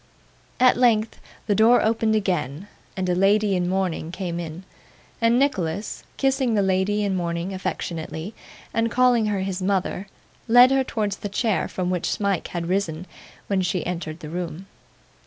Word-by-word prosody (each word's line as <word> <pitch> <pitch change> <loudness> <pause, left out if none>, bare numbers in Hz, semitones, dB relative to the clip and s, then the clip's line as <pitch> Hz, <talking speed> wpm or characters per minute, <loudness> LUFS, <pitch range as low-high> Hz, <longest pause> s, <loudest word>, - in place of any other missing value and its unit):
At 255 -1 +5
length 230 -3 +2 0.3
the 205 - +1
door 225 +4 +5
opened 220 0 +2
again, 185 -4 -1 0.3
and 185 -1 -1
a 180 - +2
lady 200 +2 +3
in 180 -1 0
mourning 185 -4 -1
came 175 -2 -4
in; 170 +1 -6 0.6
and 230 +1 +4
Nicholas 205 - -1
kissing 270 -4 +1
the 200 - +3
lady 190 +2 +1
in 195 -2 0
mourning 170 +1 -2
affectionately, 170 0 -4 0.4
and 230 0 +1
calling 245 -2 +3
her 205 -2 -1
his 190 0 -3
mother, 190 0 -1 0.4
led 245 +3 +7
her 270 0 +3
towards 210 -5 -2
the 205 - -5
chair 215 0 0
from 180 -1 -2
which 180 -2 -1
Smike 200 -4 -1
had 170 -1 -4
risen 180 -3 -1 0.4
when 195 -2 0
she 185 -1 -1
entered 170 -2 -4
the 155 - -7
room. 175 +1 -5
195 Hz, 160 wpm, -23 LUFS, 180-220 Hz, 0.6 s, led